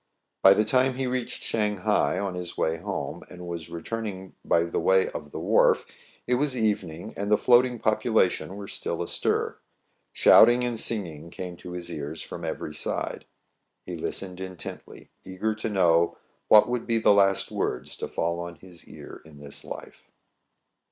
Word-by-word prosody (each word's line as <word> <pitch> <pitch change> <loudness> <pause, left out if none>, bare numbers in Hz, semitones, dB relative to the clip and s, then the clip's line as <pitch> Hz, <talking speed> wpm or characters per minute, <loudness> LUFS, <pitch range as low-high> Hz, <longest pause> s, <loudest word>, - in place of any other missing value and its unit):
By 95 0 +8
the 105 - +2
time 130 +3 +2
he 130 0 -2
reached 125 -1 -3
Shang 105 -2 -1
hai 90 - +1
on 100 -2 -2
his 90 -1 -6
way 80 +1 0
home, - - -5
and 90 -1 -10
was 85 -1 -6
returning 95 +2 -5
by 85 - +3
the 85 - -2
way 95 +3 +3
of 75 - -7
the - - -8
wharf, - - +3 0.4
it 125 - 0
was 140 -4 +1
evening, 95 -7 -2
and 100 +1 -3
the 105 - +6
floating 125 +1 +4
population 110 -4 +1
were 100 -1 -7
still - - -3
astir. - - -1 0.5
Shouting 120 +1 +6
and 120 -2 -2
singing 85 -9 -1
came 90 0 -7
to 90 - -9
his 85 -1 -6
ears 75 +1 -5
from - - -8
every 75 - -4
side. - - -3 0.6
He - - -6
listened 90 -2 -3
intently, 95 -2 -9
eager 95 +4 -2
to 110 +1 -4
know 85 -4 +3 0.3
what 105 - +7
would 125 -1 -2
be 115 -1 +2
the 110 - +5
last 95 -1 +3
words - - -2
to - - -4
fall 85 +1 -2
on 85 0 -6
his 90 -2 -14
ear - - -11
in 80 -2 -15
this 70 -1 -7
life. - - -10
95 Hz, 170 wpm, -26 LUFS, 85-110 Hz, 0.6 s, By